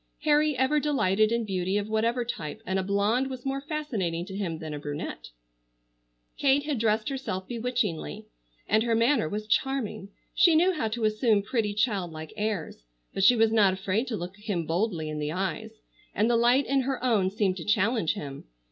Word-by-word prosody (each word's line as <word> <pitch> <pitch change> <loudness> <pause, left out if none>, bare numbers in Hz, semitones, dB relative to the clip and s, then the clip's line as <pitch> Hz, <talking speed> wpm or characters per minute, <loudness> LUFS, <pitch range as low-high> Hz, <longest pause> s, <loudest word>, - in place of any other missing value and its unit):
Harry 300 -2 +3
ever 265 +4 +2
delighted 215 -8 +2
in 235 -1 0
beauty 190 0 -1
of 205 0 -2
whatever 230 +3 0
type, 165 -6 -5
and 190 -2 0
a - - +1
blonde 205 +7 +1
was 255 -1 -7
more 270 0 -2
fascinating 230 - -3
to 190 - -8
him 180 -5 -3
than 155 -1 -6
a 145 - -5
brunette. 145 - -6 1.1
Kate 280 0 +3
had 290 -5 -2
dressed 220 +1 +1
herself 225 -9 -4
bewitchingly, 230 - -2 0.4
and 215 - +3
her 230 0 +1
manner 230 - +2
was 210 +3 -4
charming. 215 -4 -1 0.2
She 340 -3 +5
knew 360 +4 +4
how 300 -9 -1
to 220 +1 -2
assume 215 -1 +2
pretty 210 -1 -1
child 205 -4 0
like 160 +4 -8
airs, 210 - -3 0.3
but 195 - -1
she 245 +6 +7
was 225 -1 +3
not 205 -4 +5
afraid 195 +6 -1
to 225 - -2
look 180 +1 -6
him 205 -5 -3
boldly 170 0 -1
in 155 0 -4
the 150 0 -2
eyes, 195 +5 -3 0.4
and 215 - +2
the 240 - +3
light 240 +4 +4
in 275 0 +2
her 260 -1 -3
own 215 -7 +2
seemed 195 -2 0
to 165 - -6
challenge 210 -2 +1
him. 140 -7 -7
215 Hz, 190 wpm, -27 LUFS, 190-250 Hz, 1.1 s, she